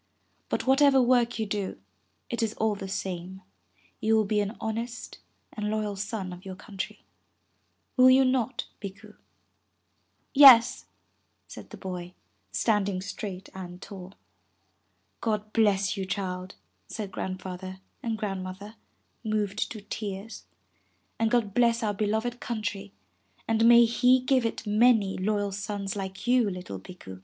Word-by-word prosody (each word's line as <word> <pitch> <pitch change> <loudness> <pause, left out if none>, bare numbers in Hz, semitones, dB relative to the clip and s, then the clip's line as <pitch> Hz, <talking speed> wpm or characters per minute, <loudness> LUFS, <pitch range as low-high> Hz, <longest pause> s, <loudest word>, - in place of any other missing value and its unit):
But - - -1
what 265 +2 +4
ever 280 -2 +6
work 240 -1 +3
you 220 - -1
do, 200 - -3 0.5
it 235 - -3
is 225 -1 -1
all 220 -1 +1
the 195 -1 -6
same, 190 0 -5 0.6
you 220 +1 +2
will 220 -1 +3
be 210 +1 +1
an 205 +2 -2
honest 230 +2 -5 0.3
and 210 -1 -3
loyal 215 -1 -1
son 195 -2 -4
of 180 +1 -11
your 190 -2 -7
country. 200 -1 -7 0.9
Will 255 0 +8
you 260 +1 +6
not, 255 -1 0 0.2
Bikku?' 200 -2 -9 1.2
Yes,'' 260 -5 +8 0.6
said - - -11
the - - -10
boy, 180 -2 -6 0.4
standing 200 -4 +1
straight 195 0 -6
and 180 -1 -8
tall. 190 -1 -10 1.1
'God 215 -1 -2
bless 200 -3 +2
you, 195 - -3
child,'' 185 -2 -4 0.3
said 205 -3 -6
Grandfather 185 0 -6 0.2
and 225 -2 -2
Grand 195 -3 -3
mother, 200 +4 -8 0.5
moved 215 -2 -1
to 215 - -7
tears. 200 - -6 0.7
''And 225 0 +2
God 230 -4 +1
bless 235 0 +3
our 210 -1 0
beloved 220 +4 -1
country, 205 -3 -4 0.6
and 225 0 +3
may 235 0 +8
He 250 +2 +4
give 255 -2 +2
it 230 - -6
many 210 -2 +4
loyal 205 +1 0
sons 200 0 -4
like 190 -1 -6
you, 245 -3 +3
little 180 - -6
Bikku. 95 - -11
210 Hz, 140 wpm, -27 LUFS, 190-230 Hz, 1.2 s, Will